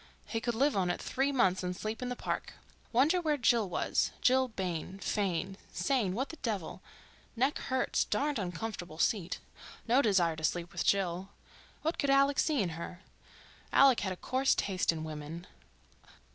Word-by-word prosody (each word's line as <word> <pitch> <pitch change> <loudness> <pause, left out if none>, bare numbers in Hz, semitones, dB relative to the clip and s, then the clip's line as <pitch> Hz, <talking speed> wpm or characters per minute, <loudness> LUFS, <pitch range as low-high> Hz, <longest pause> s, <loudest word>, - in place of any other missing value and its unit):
He 225 - -3
could 240 -1 -1
live 280 +4 +2
on 185 -2 +1
it 175 - -1
three 270 +2 0
months 190 -9 +2
and 180 0 -3
sleep 215 +2 -4
in 250 - -2
the 250 - -2
park. - - -3 0.4
Wonder 295 +9 +4
where 305 -3 +1
Jill 230 -5 +3
was—Jill 260 +7 +2
Bayne, 185 -4 -4
Fayne, 195 -2 -1
Sayne—what 250 -1 0
the 325 - -8
devil—neck 230 - -4
hurts, 260 0 0
darned 290 -3 0
uncomfortable 180 -2 -5
seat. 180 -1 +1 0.5
No 250 +4 +5
desire 185 - +3
to 160 - -8
sleep 175 +2 -1
with 175 - -2
Jill, 190 -1 +1 0.5
what 320 +2 -1
could 285 - +1
Alec 275 +1 +4
see 295 -9 +2
in 180 - -1
her? 170 +3 -7 0.7
Alec 270 -3 +6
had 190 - -2
a 185 - -5
coarse 260 +6 +1
taste 190 -3 +1
in 160 -1 -5
women. 155 +2 -6
210 Hz, 160 wpm, -32 LUFS, 180-260 Hz, 0.7 s, Alec